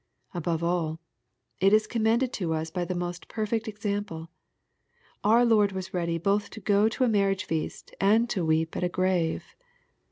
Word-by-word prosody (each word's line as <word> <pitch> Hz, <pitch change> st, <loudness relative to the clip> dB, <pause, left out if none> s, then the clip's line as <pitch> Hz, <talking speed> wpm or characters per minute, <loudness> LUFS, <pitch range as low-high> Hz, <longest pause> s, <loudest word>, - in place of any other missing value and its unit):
— -, -, -39 dB
^Above 170 Hz, -1 st, -2 dB
all, 170 Hz, -2 st, 0 dB, 0.6 s
it 195 Hz, +2 st, +4 dB
is 215 Hz, 0 st, +5 dB
commended 230 Hz, +3 st, +1 dB
to 165 Hz, -5 st, -1 dB
us 160 Hz, 0 st, -3 dB
by 180 Hz, +1 st, -2 dB
the 180 Hz, +1 st, -3 dB
most 175 Hz, 0 st, -4 dB
perfect 225 Hz, +1 st, -2 dB
example. 205 Hz, -6 st, -4 dB, 0.9 s
Our 230 Hz, +4 st, +5 dB
Lord 210 Hz, -4 st, +4 dB
was 190 Hz, 0 st, -5 dB
ready 170 Hz, -2 st, -1 dB
both 200 Hz, +5 st, 0 dB
to -, -, -4 dB
go 205 Hz, +1 st, +3 dB
to 240 Hz, -, -1 dB
a -, -, +4 dB
marriage 200 Hz, -3 st, +2 dB
feast, 160 Hz, -1 st, -4 dB
and 220 Hz, +4 st, +4 dB
to 185 Hz, -, 0 dB
weep 160 Hz, 0 st, +1 dB
at -, -, -2 dB
a 180 Hz, -, +1 dB
grave. 180 Hz, -3 st, 0 dB
190 Hz, 180 wpm, -27 LUFS, 170-215 Hz, 0.9 s, is